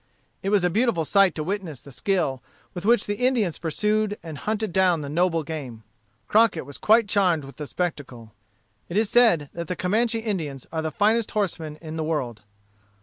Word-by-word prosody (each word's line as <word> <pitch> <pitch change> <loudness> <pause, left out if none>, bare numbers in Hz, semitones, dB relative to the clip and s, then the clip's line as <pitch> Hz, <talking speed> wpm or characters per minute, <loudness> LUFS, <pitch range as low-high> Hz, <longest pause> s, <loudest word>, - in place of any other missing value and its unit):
It 195 - -2
was 205 -3 +3
a 180 - +2
beautiful 215 -5 +1
sight 195 0 +4
to 155 - -3
witness 180 -6 -4
the 140 - -14
skill 135 -2 -1 0.3
with 180 +2 -5
which 235 +1 +4
the 205 0 -2
Indians 245 -9 +1
pursued 210 +5 0
and 155 -4 -7
hunted 215 -3 -2
down 180 -4 +3
the 140 - -5
noble 165 +1 +1
game. 135 -8 -7 0.4
Crockett 210 - +3
was 145 0 -9
quite 220 0 +4
charmed 185 -7 +2
with 135 - -12
the 150 - -6
spectacle. 130 -11 -5 0.6
It 175 - -2
is 220 -1 +2
said 220 - +4
that 170 -1 -5
the 180 - -2
Comanche 225 +6 +1
Indians 170 - -4
are 160 -1 -2
the 160 - -2
finest 215 +7 +2
horsemen 165 -7 -2
in 160 0 -6
the 160 - -1
world. 130 -9 -2
175 Hz, 190 wpm, -24 LUFS, 155-210 Hz, 0.6 s, sight